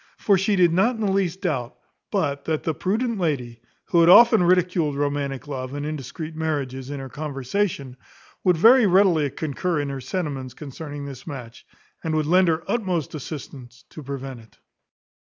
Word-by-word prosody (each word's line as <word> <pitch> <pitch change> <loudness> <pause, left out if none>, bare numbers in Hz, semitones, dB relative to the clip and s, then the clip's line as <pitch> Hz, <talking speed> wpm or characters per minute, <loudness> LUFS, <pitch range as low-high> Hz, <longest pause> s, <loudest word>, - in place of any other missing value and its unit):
For 200 - +3
she 195 +2 +1
did 175 -3 +4
not 225 +8 +3
in 220 - -6
the 205 -2 +1
least 190 -2 0
doubt, 125 -5 -2 0.3
but 145 -8 -1
that 160 -1 -1
the 160 - -1
prudent 220 - -1
lady, 125 -9 -2 0.3
who 170 - +3
had 170 0 +6
often 230 +2 +8
ridiculed 175 -4 +2
romantic 145 -1 -2
love, 130 -1 -5
and 145 0 -4
indiscreet 155 +2 -6
marriages, 140 -5 -3
in 145 -1 -5
her 135 - -6
conversation, 140 0 -3 0.5
would 180 -2 +3
very 230 +5 +6
readily 180 -6 +4
concur 160 +4 -2
in 145 -1 -2
her 135 -1 -5
sentiments 135 -3 -4
concerning 145 0 -7
this 135 0 -9
match, 125 -6 -9 0.4
and 160 -1 -1
would 155 -1 +1
lend 180 +4 +4
her 160 0 +1
utmost 185 - -1
assistance 135 -4 -9
to 155 - -9
prevent 135 -2 -6
it. 110 -1 -19
155 Hz, 175 wpm, -23 LUFS, 135-180 Hz, 0.5 s, often